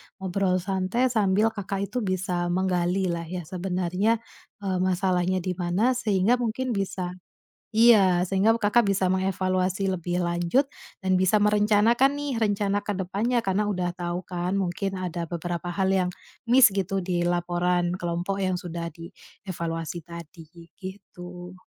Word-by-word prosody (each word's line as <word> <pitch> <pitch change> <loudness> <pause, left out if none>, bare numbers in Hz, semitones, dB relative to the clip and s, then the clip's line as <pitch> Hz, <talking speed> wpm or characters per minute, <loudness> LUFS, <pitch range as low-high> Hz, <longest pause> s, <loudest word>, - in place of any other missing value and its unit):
ngobrol 190 -1 0
santai 195 +6 0
sambil 215 0 +2
Kakak 200 -2 -4
itu 250 - -3
bisa 185 -3 -1
menggalilah 180 -1 0
ya 180 +1 -5
sebenarnya, 185 +5 -1 0.4
eee, 190 -2 -1
masalahnya 185 0 +1
di 185 - -1
mana 180 +7 +1
sehingga 230 -1 +2
mungkin 245 +2 -2
bisa 190 -4 -2 0.6
iya, 205 -6 +5
sehingga 195 +4 +2
Kakak 220 +2 +3
bisa 195 -1 +1
mengevaluasi 185 +1 0
lebih 175 0 -2
lanjut, 175 +11 +1 0.3
dan 190 -1 0
bisa 185 +3 +3
merencanakan 210 +5 +4
nih 290 -2 -3
rencana 205 -1 +1
ke 205 -2 -3
depannya 205 +7 0
karena 195 +2 +1
udah 180 -3 -2
tahu 175 0 -4
kan, 180 +2 -2
mungkin 190 +1 -2
ada 175 -2 -3
beberapa 175 +1 -3
hal 190 +2 0
yang 180 -1 +1 0.4
miss 255 0 +8
gitu 195 0 -1
di 175 -1 -1
laporan 175 0 0
kelompok 180 +2 -2
yang 185 -1 0
sudah 170 -1 -5
di 170 +4 -12 0.3
evaluasi 165 -2 -4
tadi, 170 -1 -11
gi 170 0 -14 0.3
gitu. 180 -1 -11
185 Hz, 140 wpm, -26 LUFS, 175-200 Hz, 0.6 s, miss